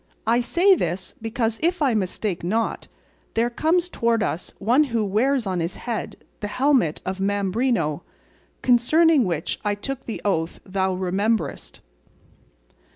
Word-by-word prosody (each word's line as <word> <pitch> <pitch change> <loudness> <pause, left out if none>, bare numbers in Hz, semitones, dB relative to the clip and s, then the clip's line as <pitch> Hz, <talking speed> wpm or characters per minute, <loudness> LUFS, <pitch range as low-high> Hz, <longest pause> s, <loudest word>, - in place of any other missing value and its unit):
I 230 +2 +3
say 350 +11 +4
this 185 - -2
because, 225 0 -1
if 350 +3 +1
I 275 -5 +2
mistake 195 -2 -2
not, 220 +6 -1 0.5
there 235 +2 +1
comes 335 +7 +1
towards 230 -9 +1
us 175 - -3
one 245 +9 +3
who 230 -5 -1
wears 240 +5 +1
on 185 -2 -1
his 170 +2 -2
head 235 -3 -4 0.2
the 205 - -3
helmet 250 - +2
of 190 +1 -3
Mambrino, 195 - 0 0.6
concerning 275 +4 +4
which 165 -4 -2
I 205 0 0
took 265 +6 -6
the 225 - -4
oath 165 -4 -1
thou 190 0 -1
rememberest." 190 - -1
225 Hz, 140 wpm, -23 LUFS, 190-255 Hz, 0.6 s, say